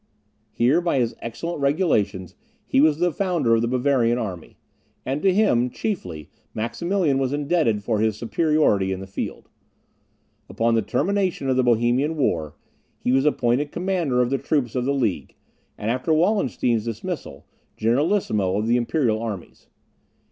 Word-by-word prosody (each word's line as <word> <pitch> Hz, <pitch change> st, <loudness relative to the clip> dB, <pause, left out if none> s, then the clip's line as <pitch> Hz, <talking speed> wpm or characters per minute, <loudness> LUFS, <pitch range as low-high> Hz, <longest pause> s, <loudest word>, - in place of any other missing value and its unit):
Here, 135 Hz, +9 st, +2 dB
by 170 Hz, -5 st, 0 dB
his 120 Hz, -3 st, 0 dB
excellent 150 Hz, +8 st, -5 dB
regulations, 105 Hz, -, 0 dB, 0.3 s
he 135 Hz, -, +2 dB
was 150 Hz, -1 st, +4 dB
the 175 Hz, +1 st, +1 dB
founder 175 Hz, -9 st, +1 dB
of 115 Hz, -, +3 dB
the 120 Hz, -, 0 dB
Bavarian 125 Hz, -1 st, +2 dB
army; 95 Hz, -8 st, -6 dB, 0.5 s
and 135 Hz, +3 st, -2 dB
to 195 Hz, -, +4 dB
him, 180 Hz, -, +2 dB
chiefly, 90 Hz, -, -5 dB, 0.2 s
Maximilian 140 Hz, -, 0 dB
was 135 Hz, 0 st, -1 dB
indebted 145 Hz, -8 st, +1 dB
for 110 Hz, -1 st, 0 dB
his 110 Hz, -1 st, +1 dB
superiority 120 Hz, -, +1 dB
in 95 Hz, -, -3 dB
the 95 Hz, -, -7 dB
field. 95 Hz, -, -6 dB, 1.0 s
Upon 115 Hz, 0 st, +1 dB
the 115 Hz, -, +3 dB
termination 180 Hz, -, -1 dB
of -, -, +2 dB
the 130 Hz, -, +3 dB
Bohemian 125 Hz, +6 st, +2 dB
war, 80 Hz, -, -1 dB, 0.4 s
he -, -, -1 dB
was 135 Hz, +2 st, +3 dB
appointed 145 Hz, 0 st, +1 dB
commander 170 Hz, -9 st, 0 dB
of 120 Hz, -, -3 dB
the 135 Hz, -, +1 dB
troops 140 Hz, -5 st, -1 dB
of 125 Hz, -1 st, -1 dB
the 140 Hz, -, +1 dB
League; 110 Hz, -, -2 dB, 0.4 s
and, 110 Hz, +2 st, -2 dB
after 130 Hz, +6 st, -1 dB
Wallenstein's 155 Hz, -, +1 dB
dismissal, 115 Hz, -1 st, -6 dB, 0.3 s
generalissimo 115 Hz, -, +1 dB
of 105 Hz, -, -1 dB
the 120 Hz, +2 st, +3 dB
imperial 120 Hz, -3 st, 0 dB
armies. 105 Hz, -7 st, -7 dB
125 Hz, 155 wpm, -23 LUFS, 115-155 Hz, 1.0 s, was